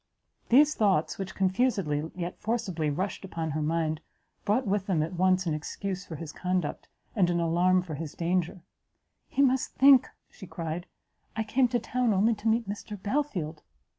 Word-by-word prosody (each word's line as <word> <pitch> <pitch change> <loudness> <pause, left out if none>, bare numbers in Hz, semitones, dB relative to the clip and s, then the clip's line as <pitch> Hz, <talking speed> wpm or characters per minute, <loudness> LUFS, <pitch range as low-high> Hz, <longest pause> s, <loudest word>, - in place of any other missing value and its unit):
These 290 +5 +6
thoughts, 195 - +1
which 190 -1 -5
confusedly, 185 - +1
yet 175 -1 -5
forcibly, 200 -9 -1
rushed 185 +9 -3
upon 165 -4 -4
her 155 +2 -2
mind, 155 0 0 0.4
brought 220 +6 +2
with 195 -1 0
them 170 -6 +2
at 165 - -4
once 185 +1 +2
an 165 - 0
excuse 185 +5 -4
for 165 - -6
his 155 0 -7
conduct, 180 -3 -2 0.3
and 185 -5 +3
an 175 0 +1
alarm 175 +2 +3
for 170 -3 -7
his 150 0 -6
danger; 175 +1 -1 0.6
"He 280 - +2
must 265 -1 +1
think," 270 -1 +6 0.2
she 190 - -11
cried, 165 +1 -5 0.5
"I 220 - 0
came 250 +4 +2
to 240 0 0
town 240 -1 0
only 215 +5 +3
to 215 +1 -5
meet 225 0 +2
Mr 205 0 -6
Belfield!" 195 - -2
185 Hz, 170 wpm, -28 LUFS, 165-220 Hz, 0.6 s, These